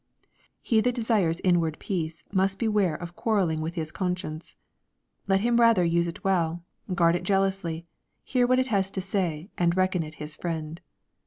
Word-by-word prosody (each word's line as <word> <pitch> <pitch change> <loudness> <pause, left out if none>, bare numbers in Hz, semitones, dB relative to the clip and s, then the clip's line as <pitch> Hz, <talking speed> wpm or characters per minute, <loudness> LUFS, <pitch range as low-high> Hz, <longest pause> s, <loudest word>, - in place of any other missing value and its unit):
He 225 -2 +3
that 245 +1 +1
desires 210 -8 +1
inward 170 -4 +2
peace 165 -4 -4
must 195 0 +1
beware 210 -7 +1
of 175 +1 -8
quarrel 215 -3 +1
ling 160 -1 -1
with 160 +2 -4
his 160 -2 -3
conscience. 180 -4 -4 0.7
Let 195 0 +3
him 235 +1 +2
rather 230 -6 +5
use 170 0 +2
it 170 - -7
well, 175 -3 0 0.3
guard 170 -2 +4
it 175 - -1
jealously, 195 -4 0 0.4
hear 250 -2 +1
what 255 +1 +3
it 260 0 +1
has 195 -3 +1
to - - +2
say, 180 -2 -2
and 175 0 +2
reckon 185 -1 +2
it 155 0 -7
his 150 0 -8
friend. 165 0 -4
180 Hz, 175 wpm, -26 LUFS, 165-200 Hz, 0.7 s, rather